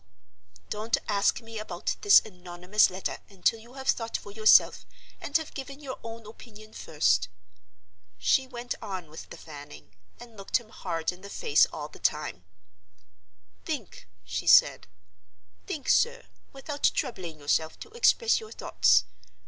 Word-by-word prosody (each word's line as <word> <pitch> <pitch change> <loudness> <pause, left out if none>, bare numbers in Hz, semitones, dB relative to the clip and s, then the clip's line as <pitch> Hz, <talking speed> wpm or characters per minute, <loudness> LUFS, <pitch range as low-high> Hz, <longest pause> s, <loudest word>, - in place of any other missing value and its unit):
—Don't 215 +2 0
ask 205 +3 +1
me 225 -1 -8
about 215 - -3
this 410 -1 +8
anonymous 180 +1 0
letter 185 +1 -4
until 200 +3 0
you 235 +3 -16
have 265 -1 -8
thought 230 -4 0
for 205 - -11
yourself, 215 +1 +5 0.4
and 290 - +1
have 320 -1 -8
given 275 0 -7
your 270 -3 -7
own 230 -1 -8
opinion 215 0 -13
first." 95 - +1 0.9
She 95 - +2
went 245 -1 -5
on 185 -7 -6
with 160 - -10
the - - -10
fanning, 145 -8 -12 0.3
and 240 -1 -13
looked 195 -1 0
him 235 -3 -13
hard 165 -6 -3
in 180 +1 -14
the 200 - -10
face 150 -5 +3
all 150 -1 -7
the - - -15
time. 150 -12 -1 1.2
"Think," - - -6 0.2
she - - -4
said; - - +6 0.8
"think, 295 - -5
sir, - - +2 0.3
without 285 +2 -1
troubling 175 -8 -4
yourself 160 +2 0
to 445 - -10
express 465 0 +3
your 440 -1 -11
thoughts. - - +3
215 Hz, 150 wpm, -28 LUFS, 175-255 Hz, 1.2 s, this